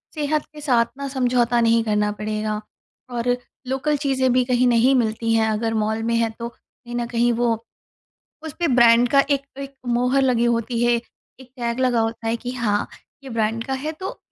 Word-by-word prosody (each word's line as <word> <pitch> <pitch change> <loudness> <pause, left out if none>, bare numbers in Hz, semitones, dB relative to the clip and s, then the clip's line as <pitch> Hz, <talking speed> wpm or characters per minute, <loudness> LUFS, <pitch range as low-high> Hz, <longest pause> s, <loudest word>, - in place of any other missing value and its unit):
सेहत 300 0 -1
के 300 - -10
साथ 245 -5 +3
न 280 - -3
समझौता 245 -3 +1
नहीं 230 0 +3
करना 210 -1 +1
पड़ेगा। 215 0 -3 0.5
और 240 0 -2 0.4
लोकल 270 +3 0
चीज़ें 265 -3 +1
भी 255 0 +3
कहीं 250 0 +2
नहीं 245 +2 +4
मिलती 225 -1 0
हैं 225 -1 +3
अगर 225 +1 -1
मॉल 220 0 -1
में 230 0 0
है 230 -1 +2
तो, 235 - -3
कहीं 240 0 -13
न 240 0 -1
कहीं 240 0 +1
वो, 235 0 +1 0.9
उसपे 320 +1 -2
ब्रांड 240 -1 +5
का 275 - +6
एक 280 -1 +2 0.2
एक 275 0 -7
मोहर 250 +3 +2
लगी 245 -3 +2
होती 235 0 0
है, 240 - +4 0.5
एक 255 - -14
टैग 235 0 -2
लगा 250 -3 +2
होता 225 0 -2
है 230 - +1
कि 245 +1 -6
हाँ, 220 -5 -1 0.4
ये 265 - -8
ब्रांड 225 0 -1
का 270 - -4
है 295 +4 -3
तो 380 - -5
240 Hz, 195 wpm, -22 LUFS, 230-260 Hz, 0.9 s, का